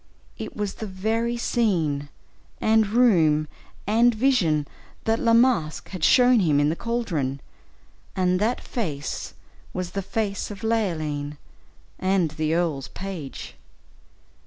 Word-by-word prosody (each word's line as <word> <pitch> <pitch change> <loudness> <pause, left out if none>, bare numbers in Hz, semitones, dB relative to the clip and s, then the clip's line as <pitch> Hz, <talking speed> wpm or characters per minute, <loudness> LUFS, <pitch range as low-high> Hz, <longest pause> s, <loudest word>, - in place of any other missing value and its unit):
It - - -7
was 205 -2 -2
the 220 - -6
very 225 +5 -1
scene, 165 -13 0 0.5
and 220 -1 +3
room, 170 -10 +4 0.4
and 230 +3 +4
vision, 185 - +2 0.4
that 225 +1 +1
La 230 -1 +3
Masque 230 -11 +2
had 185 -5 -6
shown 250 +2 +6
him 155 -7 +3
in 145 0 +3
the 160 - 0
caldron, 170 - -2 0.8
and 180 -1 +2
that 225 +5 +1
face 150 - -4 0.4
was 180 -1 -4
the 195 - -2
face 200 0 -2
of 205 +1 -9
Leoline, 155 -10 -1 0.6
and 185 -4 +1
the 155 +1 -1
earl's 155 -6 -1
page. 185 -7 -7
190 Hz, 125 wpm, -24 LUFS, 155-225 Hz, 0.8 s, shown